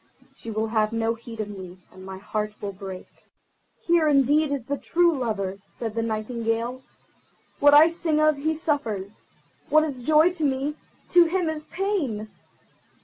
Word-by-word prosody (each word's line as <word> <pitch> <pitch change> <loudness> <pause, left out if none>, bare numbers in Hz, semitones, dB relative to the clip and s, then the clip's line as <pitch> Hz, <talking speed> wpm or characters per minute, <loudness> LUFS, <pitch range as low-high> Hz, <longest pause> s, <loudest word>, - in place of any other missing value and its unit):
She 230 - -10
will 220 0 -2
have 215 -1 +1
no 225 0 0
heed 230 0 -11
of 210 - -4
me, 190 -3 -9
and 185 - -13
my 190 0 -7
heart 210 +2 -4
will 205 - -4
break." 190 -1 -8 0.8
"Here 340 -2 +3
indeed 290 +1 +3
is 275 -5 -2
the 285 +2 -3
true 340 -1 +2
lover," 200 -7 -2
said 225 -3 -6
the 230 - -1
Nightingale. 230 +2 -2 0.8
"What 290 0 +7
I 310 +3 +8
sing 330 -3 0
of, 310 -1 +3
he 315 +3 -1
suffers—what 285 +1 -2
is 285 -5 -4
joy 310 +7 +4
to 330 -3 -5
me, 275 +1 0 0.4
to 350 -1 +6
him 350 +1 0
is 310 -1 -5
pain. 310 - -2
250 Hz, 160 wpm, -25 LUFS, 215-310 Hz, 0.8 s, I